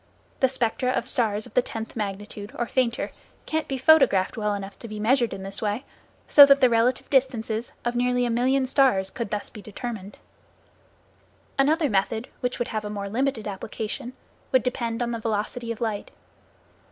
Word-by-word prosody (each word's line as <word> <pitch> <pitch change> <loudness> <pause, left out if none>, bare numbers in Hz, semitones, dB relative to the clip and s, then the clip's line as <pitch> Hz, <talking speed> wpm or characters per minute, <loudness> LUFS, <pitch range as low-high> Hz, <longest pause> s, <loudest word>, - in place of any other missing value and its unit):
The 265 - +5
spectra 250 0 0
of 245 -1 -1
stars 220 -6 0
of - - -14
the 250 - +4
tenth 225 -2 -6
magnitude, 205 -1 -5
or 240 - 0
fainter, 240 -1 0 0.3
can 315 0 -1
be 270 - -2
photographed 260 -10 +4
well 210 -2 -1
enough 195 0 -7
to 235 - -8
be 215 -1 -6
measured 240 +2 +2
in 190 - -6
this 195 +1 -3
way, 215 +5 -2 0.4
so 285 - +10
that 275 0 +6
the 255 -3 +5
relative 230 +2 +2
distances 240 -4 0
of 240 - 0
nearly 245 0 +2
a 240 - 0
million 260 +3 +2
stars 255 -8 +3
could 235 -5 -4
be 210 - 0
thus - - -7
determined. 210 -1 -7 1.4
Another 305 +3 +3
method 220 +2 0
which 250 -1 -2
would 240 - -2
have 215 -1 -3
a 210 - -5
more 200 -1 -4
limited 245 0 -1
application, 215 +4 -5 0.4
would 260 -3 +4
depend 235 -2 -1
on 240 - -2
the 230 - -3
velocity 225 +2 -2
of 230 - -5
light. 220 -3 -2
230 Hz, 180 wpm, -25 LUFS, 210-255 Hz, 1.4 s, so